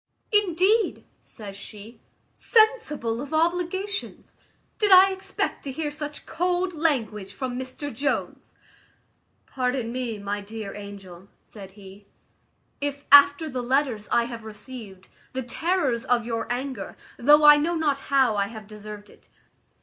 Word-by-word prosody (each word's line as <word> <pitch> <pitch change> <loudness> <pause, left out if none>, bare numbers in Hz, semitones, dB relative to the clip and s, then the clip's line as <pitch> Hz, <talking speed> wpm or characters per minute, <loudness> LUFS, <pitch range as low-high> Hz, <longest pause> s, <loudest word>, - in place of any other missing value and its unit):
"Indeed!" 415 +2 +2 0.2
says 205 -4 -10
she, 215 +3 -12 0.3
"sensible 365 - +2
of 290 +2 -5
obligations! 355 +5 -2 0.4
Did 415 -2 +3
I 380 +1 +8
expect 380 0 -4
to 275 - -3
hear 300 +2 -3
such 295 0 -7
cold 360 +2 -1
language 225 - -1
from 255 +2 -4
Mr 260 +3 -6
Jones?" 280 +5 -3 0.9
"Pardon 250 -2 -2
me, 245 -3 -3
my 205 0 -4
dear 210 0 -7
angel," 195 -3 -10 0.2
said 195 -3 -12
he, 200 0 -14 0.7
"if, 285 0 -3
after 285 +2 +7
the 255 -4 -4
letters 245 -4 0
I 235 - +4
have 235 -1 -7
received, 210 -3 -10 0.3
the 260 0 -3
terrors 270 -2 -1
of 240 -2 +1
your 230 0 -3
anger, 260 +1 -4 0.2
though 295 +4 +5
I 295 0 +9
know 330 +4 0
not 295 -4 0
how 265 -5 +3
I 200 -1 0
have 220 0 -10
deserved 210 0 -10
it." - - -21
255 Hz, 135 wpm, -25 LUFS, 215-310 Hz, 0.9 s, I